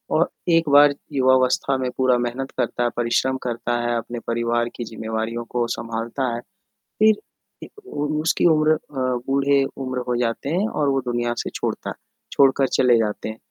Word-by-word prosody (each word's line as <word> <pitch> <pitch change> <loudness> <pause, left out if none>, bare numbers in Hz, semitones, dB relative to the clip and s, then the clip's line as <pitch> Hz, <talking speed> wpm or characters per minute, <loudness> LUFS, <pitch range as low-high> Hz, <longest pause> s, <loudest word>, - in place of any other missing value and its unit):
और - - +3 0.2
एक 165 -2 +3
बार 145 0 +7 0.2
युवावस्था 130 0 +3
में 130 -1 -2
पूरा 130 -1 +3
मेहनत 120 +2 -3
करता 120 - -1
है, 120 - +2
परिश्रम 120 +2 +1
करता 120 0 -2
है, 120 - 0
अपने 120 +1 -5
परिवार 120 0 0
की 120 - -4
ज़िम्मेवारियों 110 +1 -4
को 120 -1 +1
संभालता 115 +2 -3
है 120 - -5 0.6
फ़िर 215 -1 +6 0.5
ए - - -8 0.3
उ 145 - -1 0.2
उसकी 160 - +1
उम्र 155 -2 +4
अ, - - 0 0.5
बूढ़े 140 0 +3
उम्र 130 -1 -3
हो 125 - 0
जाते 120 +3 -2
हैं 190 +7 +1
और 145 -8 0
वो 135 0 +1
दुनिया 120 -1 -1
से - - -3
छोड़ता - - -3
है - - -6 0.4
छोड़कर 135 -1 +4
चले 125 -2 +5
जाते 110 0 -2
हैं। 110 - -7
125 Hz, 180 wpm, -22 LUFS, 120-140 Hz, 0.6 s, बार